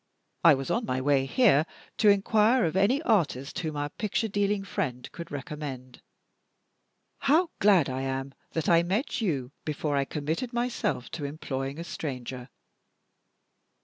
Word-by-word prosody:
I 165 Hz, -4 st, +8 dB
was 135 Hz, 0 st, -4 dB
on 230 Hz, -1 st, 0 dB
my 130 Hz, -, 0 dB
way 135 Hz, 0 st, +2 dB
here 195 Hz, -, +4 dB, 0.3 s
to 215 Hz, -, +5 dB
inquire 215 Hz, +4 st, +4 dB
of 165 Hz, -, -1 dB
any 230 Hz, +11 st, +3 dB
artist 165 Hz, -, +1 dB
whom 155 Hz, -4 st, -3 dB
our 145 Hz, 0 st, -2 dB
picture 215 Hz, +6 st, -1 dB
dealing 205 Hz, -1 st, 0 dB
friend 125 Hz, -9 st, -3 dB
could 170 Hz, -, -8 dB
recommend. 135 Hz, -3 st, -7 dB, 1.2 s
How 315 Hz, +5 st, +3 dB
glad 190 Hz, -7 st, +5 dB
I 130 Hz, 0 st, -3 dB
am 135 Hz, 0 st, -3 dB, 0.2 s
that 160 Hz, -2 st, -1 dB
I 170 Hz, -1 st, +6 dB
met 220 Hz, -, -1 dB
you 140 Hz, -, -1 dB
before 150 Hz, -1 st, -2 dB
I -, -, +3 dB
had 135 Hz, -, -2 dB
committed 160 Hz, -, -3 dB
myself 235 Hz, -, -1 dB
to 155 Hz, -3 st, -4 dB
employing 140 Hz, -1 st, -4 dB
a -, -, -4 dB
stranger!" 130 Hz, -6 st, -6 dB
160 Hz, 150 wpm, -28 LUFS, 135-210 Hz, 1.2 s, I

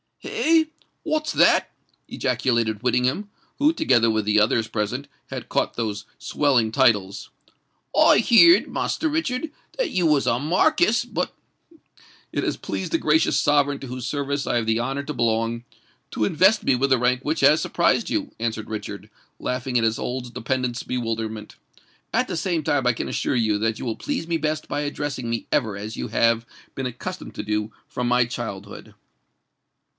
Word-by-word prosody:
"Hey! 320 Hz, 0 st, +2 dB, 0.4 s
what's 310 Hz, 0 st, -1 dB
that?" -, -, +4 dB, 0.4 s
ejaculated 115 Hz, -4 st, 0 dB
Whittingham, 125 Hz, -, 0 dB, 0.3 s
who, 295 Hz, +2 st, +4 dB
together 120 Hz, -, +3 dB
with 110 Hz, -1 st, 0 dB
the 105 Hz, 0 st, +3 dB
others 110 Hz, +1 st, +2 dB
present, 115 Hz, +6 st, -3 dB, 0.2 s
had -, -, -7 dB
caught -, -, 0 dB
those 105 Hz, -3 st, -3 dB
swelling 115 Hz, 0 st, +1 dB
titles. 100 Hz, -4 st, +2 dB, 0.7 s
"I -, -, +7 dB
heerd, 295 Hz, -, +6 dB
Master 315 Hz, -, -1 dB
Richard, 300 Hz, -1 st, -2 dB, 0.3 s
that -, -, 0 dB
you 180 Hz, -2 st, +1 dB
was 150 Hz, -3 st, +3 dB
a 115 Hz, -, +2 dB
Markiss; 235 Hz, -, +2 dB
but——" 245 Hz, -, -3 dB, 1.0 s
"It -, -, -2 dB
has -, -, -1 dB
pleased -, -, -4 dB
the 330 Hz, -, +3 dB
gracious 320 Hz, -, +2 dB
sovereign 145 Hz, -1 st, +2 dB
to 135 Hz, -, -8 dB
whose 125 Hz, 0 st, -5 dB
service 140 Hz, 0 st, -2 dB
I -, -, +1 dB
have 115 Hz, -, 0 dB
the 110 Hz, 0 st, +2 dB
honour 135 Hz, +4 st, -2 dB
to 150 Hz, -, -5 dB
belong, 115 Hz, 0 st, 0 dB, 0.5 s
to 110 Hz, -, 0 dB
invest 190 Hz, -, +3 dB
me 130 Hz, -, +3 dB
with 135 Hz, +3 st, +1 dB
the 130 Hz, -, +4 dB
rank 125 Hz, +1 st, +1 dB
which 155 Hz, +1 st, -1 dB
has 145 Hz, +3 st, +5 dB
surprised 175 Hz, +6 st, +1 dB
you," 290 Hz, -3 st, -2 dB
answered 110 Hz, -1 st, -3 dB
Richard, 110 Hz, -1 st, -6 dB, 0.3 s
laughing 125 Hz, 0 st, -2 dB
at 115 Hz, -, +2 dB
his 115 Hz, 0 st, +1 dB
old 125 Hz, -1 st, -4 dB
dependant's 125 Hz, -1 st, -2 dB
bewilderment: 115 Hz, -3 st, -4 dB, 0.6 s
"at 255 Hz, +2 st, +2 dB
the 180 Hz, -, -3 dB
same 170 Hz, -3 st, -1 dB
time 145 Hz, -3 st, +1 dB
I 125 Hz, -, +4 dB
can -, -, -4 dB
assure -, -, -1 dB
you 110 Hz, -3 st, +2 dB
that 110 Hz, 0 st, 0 dB
you -, -, -5 dB
will 115 Hz, -2 st, -2 dB
please 275 Hz, -, -3 dB
me 170 Hz, -1 st, 0 dB
best 155 Hz, 0 st, -2 dB
by 145 Hz, -, -2 dB
addressing 145 Hz, -4 st, -3 dB
me 115 Hz, -1 st, -3 dB
ever 105 Hz, -3 st, +1 dB
as 105 Hz, +3 st, -6 dB
you -, -, -3 dB
have 115 Hz, 0 st, +2 dB, 0.3 s
been 135 Hz, -1 st, -2 dB
accustomed 125 Hz, 0 st, -7 dB
to -, -, -4 dB
do 105 Hz, +1 st, -2 dB, 0.2 s
from 125 Hz, -1 st, -3 dB
my 125 Hz, 0 st, +3 dB
childhood." 110 Hz, -5 st, -7 dB
125 Hz, 175 wpm, -23 LUFS, 115-155 Hz, 1.0 s, I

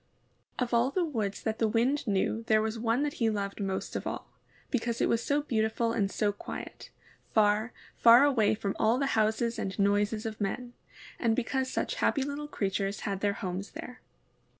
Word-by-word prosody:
Of 250 Hz, -2 st, -2 dB
all 235 Hz, +2 st, +4 dB
the 350 Hz, +5 st, 0 dB
woods 220 Hz, -10 st, -3 dB
that 220 Hz, 0 st, -2 dB
the 225 Hz, -, +3 dB
Wind 245 Hz, +6 st, +1 dB
knew 205 Hz, +3 st, 0 dB
there 220 Hz, -2 st, +5 dB
was 220 Hz, +1 st, -2 dB
one 230 Hz, +4 st, +1 dB
that 295 Hz, -1 st, -1 dB
he 225 Hz, -, +4 dB
loved 200 Hz, -1 st, -3 dB
most 190 Hz, -1 st, -3 dB
of -, -, -3 dB
all, -, -, -4 dB, 0.5 s
because 235 Hz, -2 st, -1 dB
it -, -, +3 dB
was 230 Hz, 0 st, +1 dB
so 290 Hz, +1 st, +1 dB
beautiful 230 Hz, -2 st, 0 dB
and 205 Hz, -4 st, 0 dB
so 205 Hz, +1 st, 0 dB
quiet, 205 Hz, -, -8 dB, 0.4 s
far, 215 Hz, +2 st, +2 dB, 0.3 s
far 235 Hz, +3 st, +8 dB
away 235 Hz, -7 st, +3 dB
from 205 Hz, -2 st, -3 dB
all 225 Hz, +3 st, +3 dB
houses 230 Hz, -3 st, +1 dB
and 190 Hz, -1 st, -3 dB
noises 205 Hz, +2 st, +1 dB
of 220 Hz, -1 st, -5 dB
men, 240 Hz, +5 st, -3 dB, 0.5 s
and 230 Hz, -2 st, +2 dB
because 260 Hz, +2 st, -1 dB
such -, -, -1 dB
happy 275 Hz, -, +2 dB
little 285 Hz, +2 st, -4 dB
creatures 195 Hz, -5 st, -2 dB
had 200 Hz, -3 st, -2 dB
their 205 Hz, 0 st, +1 dB
homes 190 Hz, +1 st, -5 dB
there. 250 Hz, 0 st, -9 dB
225 Hz, 185 wpm, -29 LUFS, 205-245 Hz, 0.5 s, far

